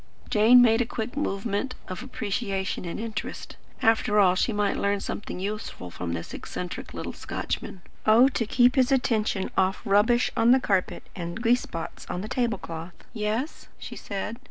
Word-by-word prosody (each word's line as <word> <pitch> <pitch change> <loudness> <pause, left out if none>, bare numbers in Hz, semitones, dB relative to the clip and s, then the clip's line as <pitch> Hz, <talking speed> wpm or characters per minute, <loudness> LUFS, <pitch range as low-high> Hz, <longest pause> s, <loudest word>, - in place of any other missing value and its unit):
Jane 230 +4 +7
made 225 0 +4
a - - +1
quick 225 +2 -4
movement 220 -1 -2
of 185 - -5
appreciation 200 -6 -3
and 170 - -4
interest. 220 -1 -5 0.3
After 220 -2 +3
all 185 -3 +6
she 185 +5 +1
might 205 -2 +1
learn 200 0 +1
something 195 -1 -5
useful 200 - -5
from 85 0 -4
this 85 0 -5
eccentric - - -6
little - - -5
Scotchman. 180 - -5 0.2
Oh 230 +4 +7
to 230 -4 -2
keep 245 +3 +4
his 255 0 +4
attention 220 -6 +1
off 190 +1 +2
rubbish 215 +4 +3
on 230 - +3
the 260 +2 +7
carpet, 195 -7 0
and 170 +1 -5
grease 240 +1 +3
spots 165 -1 -7
on 180 - -3
the 210 - -5
table 235 -3 0
cloth! 165 0 -7 0.2
"Yes?" 220 +6 -3
she - - -8
said. 205 +3 -5
215 Hz, 170 wpm, -26 LUFS, 190-240 Hz, 0.3 s, Jane